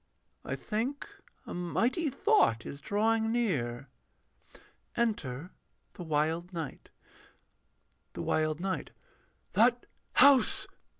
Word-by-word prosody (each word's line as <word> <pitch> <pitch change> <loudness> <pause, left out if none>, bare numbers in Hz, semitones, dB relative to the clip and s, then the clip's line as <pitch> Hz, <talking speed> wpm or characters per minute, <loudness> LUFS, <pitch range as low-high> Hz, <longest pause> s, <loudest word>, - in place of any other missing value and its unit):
I - - -3
think 240 +6 -3 0.4
a - - -7
mighty 235 - 0
thought 270 - +2
is 140 - -7
drawing 220 +4 +1
near. 140 - -1 1.1
[Enter 180 - -1 0.4
THE 195 - -10
WILD 160 +2 -1
KNIGHT.] 165 -5 -6 1.2
THE - - -5
WILD 155 0 0
KNIGHT. 190 +1 -3 0.6
That 240 +2 +3 0.3
house.... 270 -1 +6
195 Hz, 95 wpm, -30 LUFS, 155-235 Hz, 1.2 s, house